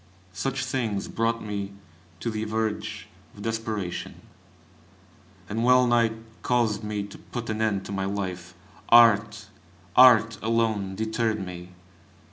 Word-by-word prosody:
Such 95 +10 -2
things 110 -6 -2
brought 115 0 -1
me 100 -1 -4 0.5
to 115 - -2
the 110 0 -3
verge 110 0 -3 0.3
of 100 - -10
desperation, 110 -5 -3 1.3
and 110 +4 -2
wellnigh 120 -2 +4 0.3
caused 115 -4 +1
me 105 -1 -3
to 100 - -11
put 120 -2 -6
an 110 0 -3
end 105 -3 0
to - - -7
my 95 -1 -2
life. 95 -2 -4 0.3
Art! 110 -2 +5 0.5
art 115 -4 +6
alone, 110 -4 0
deterred 110 -1 -1
me. 90 0 -9
110 Hz, 120 wpm, -26 LUFS, 100-115 Hz, 1.3 s, art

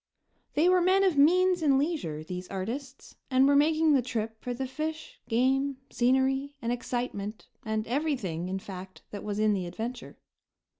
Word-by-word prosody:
They 315 +4 +4
were 365 0 +5
men 375 +2 +4
of 375 -5 +3
means 360 +5 +4
and 280 -4 +4
leisure, 275 - -2
these 180 +2 -6
artists, 250 +8 -6
and 260 0 +4
were 285 - +4
making 310 +1 +4
the 270 - +4
trip 225 -2 -4
for 250 - -4
the 255 +2 -3
fish, 310 +4 -5
game, 265 +3 +2
scenery 265 +3 +1
and 235 -3 -2
excitement 240 -4 -4
and 220 -1 -2
everything, 235 - -2
in 190 - -2
fact, 190 -1 -9
that 205 - -6
was 205 -1 -3
in 215 0 +3
the 185 -3 -2
adventure. 230 +6 -6
255 Hz, 165 wpm, -28 LUFS, 215-290 Hz, -, were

